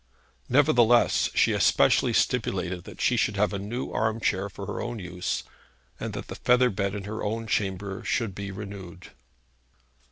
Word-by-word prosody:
Nevertheless, 120 -4 +4
she - - +4
especially - - +3
stipulated 90 +1 0
that - - -11
she 120 - +2
should 105 -2 +1
have 105 -1 +2
a 100 - -2
new 115 +6 -4
arm 110 0 0
chair 100 -2 0
for 100 0 -8
her 105 - -4
own 120 0 -4
use, 90 -2 -3 0.6
and - - -4
that - - -5
the - - -6
feather 125 0 +3
bed 100 0 -2
in 100 - -5
her 110 +2 -5
own 115 +2 -2
chamber 100 -2 -2
should 115 -5 -1
be 100 +1 -6
renewed. 95 -3 -8
105 Hz, 165 wpm, -26 LUFS, 95-115 Hz, 0.6 s, Nevertheless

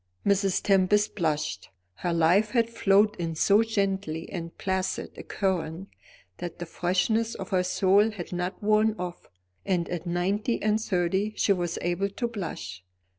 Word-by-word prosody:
Mrs. 195 -1 +2
Tempest 200 +2 +3
blushed. 155 -5 -1 0.3
Her 175 - -2
life 170 +6 +3
had 230 -2 +2
flowed 210 -1 +3
in 165 -2 -3
so 200 +6 +4
gentle 195 -7 -1
and 170 -3 -6
placid 190 0 -2
a - - -8
current, 185 -1 -2 0.5
that 175 -2 -6
the 175 - -5
freshness 190 +7 0
of - - -7
her 185 -3 +2
soul 190 +3 +3
had 190 -5 -7
not 180 +3 -3
worn 215 +1 +3
off, 180 -1 -6 0.3
and 180 -3 0
at 175 0 -4
nine 175 +4 0 0.2
and 215 +1 +2
thirty 190 +2 0
she 200 - +3
was 175 -2 -2
able 175 +3 0
to 235 +5 -3
blush. 165 - -6
190 Hz, 155 wpm, -27 LUFS, 175-210 Hz, 0.5 s, so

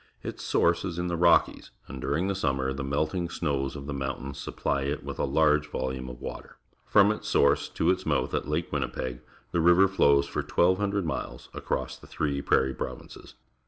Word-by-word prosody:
Its - - -6
source 85 0 +2
is 90 -3 -4
in 90 0 -2
the 85 - -1
Rockies, 85 0 +3 0.2
and 65 - -8
during 75 +8 0
the 100 - 0
summer 65 -7 -1
the 70 0 -4
melting 80 +6 -1
snows 70 -5 -2
of 70 -1 -7
the 70 - -4
mountains 70 0 -4
supply 70 - -2
it 70 +2 -2
with - - -6
a - - +2
large 75 -1 +2
volume 65 -2 -3
of 60 0 -9
water. - - -8 0.3
From 100 +1 +5
its 105 - -5
source 70 0 +3
to - - +1
its 95 0 -1
mouth 75 -5 0
at - - -1
Lake 75 +3 -2
Win - - 0
nipeg, 65 -1 -4 0.3
the 85 - +1
river 90 +3 +6
flows 70 -7 +4
for 70 - -3
1,200 100 +2 +1
miles 80 - -5
across - - -3
the - - -16
three 70 -3 -2
Prairie 65 -1 +2
Pro\ 65 - -4
inces. - - -14
75 Hz, 200 wpm, -27 LUFS, 70-85 Hz, 0.3 s, river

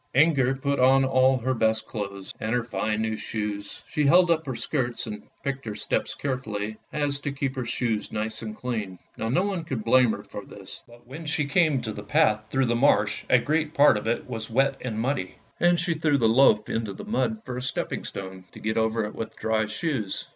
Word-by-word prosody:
Inger 135 -3 +4
put 140 +1 -1
on 135 +1 +5
all 130 0 +4
her 130 +1 -1
best 110 -2 +1
clothes, 100 -3 -6
and 110 +2 -1
her 120 - +1
fine 110 0 -1
new 110 0 -1
shoes; 105 -2 -5
she 150 - -1
held 175 +5 +6
up 160 -2 +1
her 130 - -3
skirts 120 0 -1
and 105 -2 -6 0.2
picked 135 0 -3
her 105 -2 -4
steps - - -1
carefully 110 -6 -3
so 110 - -20 0.2
as 145 -1 +1
to 140 0 -3
keep 140 -1 -2
her 130 -2 -3
shoes 115 -4 -1
nice 110 +1 -3
and 110 -2 -6
clean. 110 -7 -4 0.2
Now 115 - -3
no 175 +10 +2
one 190 -5 -2
could 130 -8 -4
blame 120 0 +5
her - - -6
for - - -8
this; - - -11
but 120 0 -17
when 150 +6 -8
she 150 -1 +1
came 145 -3 +2
to 110 - -3
the 105 - -7
path 105 +1 +2
through 135 +2 +2
the 120 -1 +1
marsh 110 -5 +2
a 125 - +7
great 155 +4 0
part 145 -3 +6
of 105 +1 -3
it 115 - -1
was 110 -1 -5
wet 135 +4 +2
and 115 -4 -3
muddy, 120 -6 -1 0.2
and 175 0 +4
she 175 0 +1
threw 155 -2 +2
the 115 -4 +3
loaf 110 -2 +5
into 110 -3 -2
the - - -9
mud 220 0 -1
for 125 - -5
a - - -3
stepping 130 - -3
stone, 95 -1 -7
to - - -10
get 110 +1 -2
over 110 -1 +1
with 115 - -6
dry 110 -1 0
shoes. 110 - -3
120 Hz, 225 wpm, -26 LUFS, 110-140 Hz, 0.2 s, a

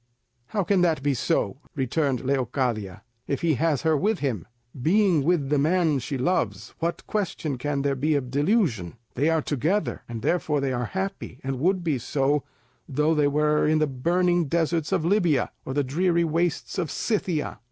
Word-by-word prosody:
"How 205 -3 -1
can 190 0 +2
that 160 -6 +2
be 145 -1 +2
so," 125 0 0 0.2
returned 135 -1 0
Leocadia, 125 -7 -1 0.2
"if 140 - -2
he 165 -2 +2
has 160 -4 +1
her 160 -1 +3
with 205 +8 +1
him? 125 - -2 0.3
Being 180 - +3
with 155 -3 +1
the 150 -1 +2
man 160 -1 +2
she 135 +2 -4
loves, 175 +9 -1
what 170 +1 -2
question 165 -9 -2
can 140 +1 -1
there 140 -1 +1
be 150 +3 +1
of 130 -3 -2
delusion? 145 - +1 0.2
They 145 +5 +1
are 160 -2 +1
together, 150 - -1
and 115 -1 -6
therefore 155 -4 +1
they 135 -1 -1
are 125 0 -1
happy, 190 -9 -4
and 135 -1 -3
would 185 +4 +1
be 155 -6 0
so, 140 +4 0 0.5
though 150 +3 +2
they 150 -2 +3
were 150 +1 +2
in 155 +1 +3
the 155 - +3
burning 175 +6 +1
deserts 165 +1 0
of 180 -4 +1
Lybia, 175 -8 +2
or 130 - -4
the 145 - +2
dreary 170 +5 +1
wastes 165 +2 -1
of 170 -4 -1
Scythia. 185 - -1
150 Hz, 180 wpm, -25 LUFS, 135-170 Hz, 0.5 s, her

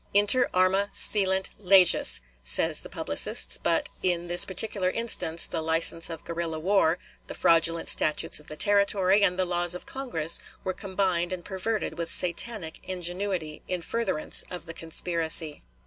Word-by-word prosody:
Inter 205 +5 +5
arma 190 +2 +1
silent 190 -2 +2
leges, 185 - +6 0.2
say - - +2
the - - -2
publicists; - - +1
but - - 0
in 175 -1 -2
this 175 0 +5
particular 190 0 -1
instance 185 -7 0
the - - -5
license 165 +1 0
of 165 -1 -9
guerrilla 170 -1 -5
war, 175 0 +1 0.3
the - - -8
fraudulent 165 0 +2
statutes 155 - +1
of 150 - -10
the 155 - -9
Territory, 200 0 +2
and 180 -2 +2
the 185 - 0
laws 175 0 -2
of 180 - -10
Congress 170 - -2 0.2
were 185 - -3
combined 185 -3 -2
and 180 -2 -6
perverted 210 0 -4
with 165 -1 -3
satanic 180 0 -3
ingenuity 180 -3 -3
in 180 -2 -4
furtherance 230 -6 0
of 180 -2 -9
the 165 - -9
conspiracy. 165 -2 -1
180 Hz, 150 wpm, -25 LUFS, 165-195 Hz, 0.3 s, leges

